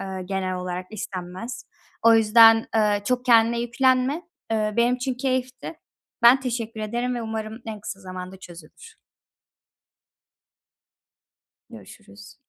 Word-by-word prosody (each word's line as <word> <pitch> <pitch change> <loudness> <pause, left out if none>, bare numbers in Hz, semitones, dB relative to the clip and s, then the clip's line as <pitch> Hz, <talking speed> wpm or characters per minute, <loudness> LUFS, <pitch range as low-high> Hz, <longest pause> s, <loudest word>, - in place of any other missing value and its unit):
Iıı, 190 -1 -6
genel 190 -1 -2
olarak 180 0 -5
istenmez. 195 +3 -7 0.4
O 230 0 +6
yüzden, 225 0 +6
eee, 210 -2 +2
çok 250 +2 -1
kendine 235 -1 +4
yüklenme. 260 +5 +1 0.3
Eee, 215 -1 -1
benim 240 +1 +3
için 255 +1 -3
keyifti. 255 +3 -3 0.5
Ben 245 +3 +7
teşekkür 230 -3 -4
ederim 240 +4 -2
ve 240 - -4
umarım 220 0 -5
en 215 -2 -6
kısa 200 -1 -7
zamanda 185 0 -8
çözülür. 175 -4 -14 2.7
Görüşürüz. 100 +1 -14
225 Hz, 115 wpm, -23 LUFS, 190-245 Hz, 2.7 s, Ben